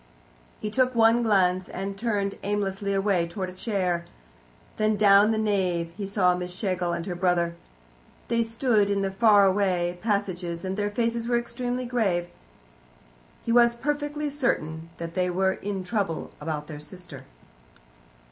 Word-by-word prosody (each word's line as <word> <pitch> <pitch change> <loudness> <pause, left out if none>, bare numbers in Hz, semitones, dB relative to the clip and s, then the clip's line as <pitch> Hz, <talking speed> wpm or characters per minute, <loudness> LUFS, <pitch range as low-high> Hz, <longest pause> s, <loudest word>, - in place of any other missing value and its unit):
He 210 - -4
took 255 +2 +2
one 230 +1 +5
glance, 185 -4 +2
and 195 +1 -4
turned 200 -2 -1
aimlessly 200 -1 -2
away 195 -3 +1
towards 185 +1 -5
a - - -18
chair. 185 -4 -1 0.7
Then 215 0 +2
down 205 0 +6
the 220 - +1
nave 185 -6 0
he 200 -2 -4
saw 190 -2 +3
Miss 180 0 -4
Schlegel 180 -2 -2
and 170 -1 -3
her 185 - -3
brother. 175 -1 +1 0.7
They 235 0 +2
stood 225 -2 +1
in 200 -1 +1
the 195 - -1
fairway 195 -4 +4
of 175 0 -14
passengers, 185 -5 -2
and 190 0 -2
their 205 0 -1
faces 230 +2 -1
were 240 0 +2
extremely 245 +1 -3
grave. 195 -8 0 1.2
He 230 - 0
was 235 0 +5
perfectly 295 +3 -2
certain 165 - -2
that 170 0 -6
they 180 -1 0
were 190 +2 +2
in 195 -1 -4
trouble 185 -5 -2
about 150 -1 -3
their 150 -1 -8
sister. 180 +4 -10
195 Hz, 155 wpm, -26 LUFS, 180-225 Hz, 1.2 s, down